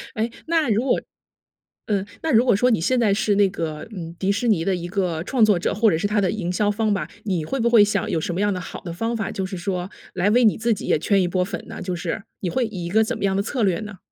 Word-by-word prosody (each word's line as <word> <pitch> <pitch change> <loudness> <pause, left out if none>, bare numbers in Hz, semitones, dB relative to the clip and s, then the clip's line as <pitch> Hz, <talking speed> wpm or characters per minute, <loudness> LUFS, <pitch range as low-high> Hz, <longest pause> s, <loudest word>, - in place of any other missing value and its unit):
诶？ 225 +1 -1 0.2
那 325 -4 +1
如 220 +3 +2
果 270 - +2 0.9
嗯， 200 -3 +1 0.2
那 320 - 0
如 225 +1 +6
果 245 - +4
说 250 +5 +3
你 220 - +2
现 255 +9 +2
在 215 -4 +3
是 210 0 +1
那 200 0 +5
个， 155 -5 -5
嗯， 170 -2 -7
迪 190 +2 +1
士 200 +5 -1
尼 185 -7 +2
的 195 - +1
一 175 -1 -5
个 175 -4 -1
创 235 +3 +3
作 205 -4 +3
者， - - 0
或 215 +1 +3
者 - - +2
是 205 - 0
它 210 0 +1
的 190 -2 +1
营 195 -5 -2
销 205 +3 +1
方 215 +1 0
吧， 200 - -1 0.2
你 180 -6 -1
会 270 +12 -3
不 235 0 +2
会 230 -3 +7
想 205 -2 0
有 165 - 0
什 175 - -3
么 180 - -1
样 205 0 +2
的 185 - -2
好 180 - -8
的 175 - -6
方 225 +7 -2
法， 220 -3 -2
就 190 - -3
是 190 +1 -5
说 180 +1 -3 0.2
来 185 +3 +2
为 245 +3 +4
你 215 - +4
自 230 +1 +1
己 200 - -6
也 - - +3
圈 195 +5 +2
一 180 - +1
波 180 +1 0
粉 180 -3 -6
呢？ - - -8
就 180 -1 -2
是 175 +4 -4 0.2
你 185 - -2
会 255 +6 0
以 195 -6 -5
一 - - -4
个 220 +4 +4
怎 220 - -2
么 - - -6
样 195 -1 +2
的 200 - +1
策 245 +3 -3
略 190 -2 +1
呢？ 210 -2 -8
200 Hz, 325 characters per minute, -23 LUFS, 180-220 Hz, 0.9 s, 会